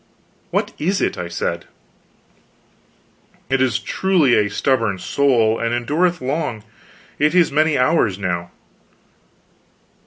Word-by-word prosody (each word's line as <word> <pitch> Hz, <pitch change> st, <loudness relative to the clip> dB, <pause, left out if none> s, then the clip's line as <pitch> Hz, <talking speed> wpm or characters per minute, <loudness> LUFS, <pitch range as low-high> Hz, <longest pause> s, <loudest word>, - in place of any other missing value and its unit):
"What -, -, -1 dB
is 185 Hz, +6 st, 0 dB
it?" -, -, 0 dB
I 90 Hz, -, -5 dB
said. 85 Hz, 0 st, -3 dB, 1.9 s
"It 135 Hz, -1 st, +2 dB
is 125 Hz, -4 st, +2 dB
truly 160 Hz, +1 st, +1 dB
a 105 Hz, -2 st, +3 dB
stubborn 115 Hz, -2 st, 0 dB
soul, 115 Hz, 0 st, +1 dB
and 115 Hz, +1 st, -1 dB
endureth 160 Hz, +8 st, 0 dB
long. 130 Hz, -5 st, -3 dB, 0.6 s
It 150 Hz, +3 st, +2 dB
is 175 Hz, -4 st, +4 dB
many 155 Hz, +1 st, +2 dB
hours 125 Hz, -, +2 dB
now." 85 Hz, -3 st, -3 dB
130 Hz, 115 wpm, -19 LUFS, 110-155 Hz, 1.9 s, is